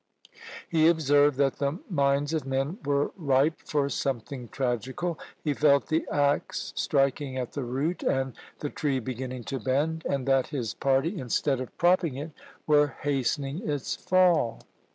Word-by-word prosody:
He 160 -1 +4
observed 145 -4 +4
that 135 -1 +2
the 140 +3 0
minds 140 -3 +1
of 155 -3 0
men 135 - -2
were 140 0 +1
ripe 145 -2 +2
for 145 -2 -1
something 130 -2 -3
tragical; 130 +8 -2 0.2
he 150 - +1
felt 140 -1 +3
the 160 +1 0
axe 145 0 0
striking 135 -1 0
at 125 -2 -3
the 145 - -4
root, 135 +8 -2
and 135 -1 0 0.3
the 145 - -3
tree 145 -4 -1
beginning 130 0 -5
to 135 +4 -4
bend, 150 +7 0
and 135 -1 -1
that 135 -1 +3
his 125 -7 -3
party, 140 +8 +1
instead 130 +2 0
of 130 - -8
propping 175 -4 +3
it, 150 +4 -6 0.3
were 150 -2 +3
hastening 145 +3 -1
its 145 -3 -2
fall. 175 -11 +2
140 Hz, 155 wpm, -27 LUFS, 130-155 Hz, 0.3 s, He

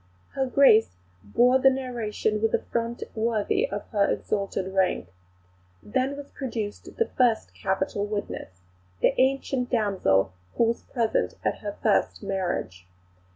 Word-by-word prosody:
Her 265 -1 -1
Grace 235 - +5 0.3
bore 245 - +4
the 270 - +6
narration 235 -5 -2
with 225 0 +2
a - - -2
front 235 0 -2
worthy 230 - 0
of - - -4
her 205 -3 +2
exalted 195 -1 -2
rank. 185 - 0 0.7
Then 260 +5 -1
was 285 0 -9
produced 225 -6 -5
the 460 - +3
first 240 -3 +2
capital 190 +1 -1
witness, 205 - -5 0.4
the - - +4
ancient 265 -1 +1
damsel 185 - +2 0.2
who - - +3
was 230 0 +1
present 225 - -1
at - - -1
her - - -5
first 90 - +2
marriage. 175 - -3
220 Hz, 135 wpm, -26 LUFS, 195-255 Hz, 0.7 s, the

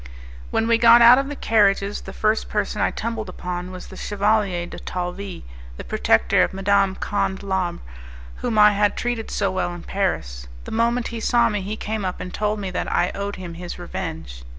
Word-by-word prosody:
When 225 - 0
we 230 0 +3
got 235 0 +8
out 245 +3 +9
of 275 - -2
the 290 - -5
carriages, 205 -4 +2
the - - -9
first 215 0 0
person 210 0 -1
I - - +3
tumbled 225 -3 -4
upon 180 0 -5
was 185 -1 -8
the - - -11
Chevalier 205 -3 0
de - - -9
Talvis, 180 +1 -5 0.3
the - - -7
protector - - +2
of - - 0
Madame 195 0 +2
Conde 190 -1 -2
Labre, 190 -3 -2 0.6
whom 235 -3 -2
I 210 0 +8
had 205 0 +1
treated 240 -2 -2
so 195 - 0
well 185 -1 -1
in 175 - -10
Paris. - - -2 0.2
The - - -8
moment 235 +2 +1
he 235 - -5
saw 240 +1 +3
me, 210 -1 -2
he 205 +3 -4
came 215 -1 -3
up 185 -1 -3
and 180 - -7
told 210 0 -1
me 195 -2 -4
that 180 - -3
I 175 - +1
owed 200 0 -4
him 180 -2 -8
his 175 +1 -7
revenge. 165 - -6
200 Hz, 200 wpm, -22 LUFS, 180-220 Hz, 0.6 s, out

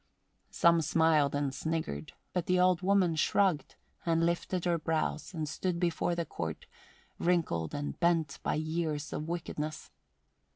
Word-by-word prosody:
Some 170 -2 +4
smiled 155 -2 +3
and 145 -2 0
sniggered; 140 - -3 0.2
but 180 -2 -1
the 180 0 +3
old 180 -1 +4
woman 185 -3 +3
shrugged, 160 -2 +1 0.3
and 165 -1 +2
lifted 175 +1 -1
her 170 -1 +2
brows, 155 +1 -1
and 155 -2 -2
stood 170 +3 -2
before 175 0 0
the 170 -1 -1
Court, 80 - -5 0.5
wrinkled 160 - 0
and 145 0 -4
bent 165 -4 +1
by - - 0
years 155 -1 -2
of 155 - -4
wickedness. 155 -2 -4
165 Hz, 140 wpm, -31 LUFS, 150-175 Hz, 0.5 s, Some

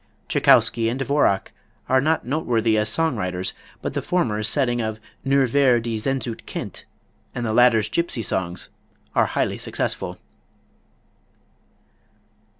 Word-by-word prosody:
Tschaikowsky 115 -1 +4
and 120 - -2
Dvorak 135 -8 +1 0.4
are 130 0 +3
not 160 +2 +1
noteworthy 120 -5 +1
as 105 0 +2
song 160 +5 0
writers, 90 -2 -3 0.3
but - - -3
the - - -2
former's 110 -11 0
setting 120 -4 +1
of 110 -1 -3 0.2
"Nur 135 -1 +3
wer 135 -4 +4
die 115 0 -3
Sehnsucht 125 -1 -3
kennt" - - -6 0.5
and 120 - -3
the 110 - -1
latter's 115 -3 +5
"Gypsy 170 -10 -1
Songs" 90 -3 -2 0.4
are - - +3
highly - - -1
successful. - - -2
120 Hz, 130 wpm, -22 LUFS, 110-135 Hz, 0.5 s, latter's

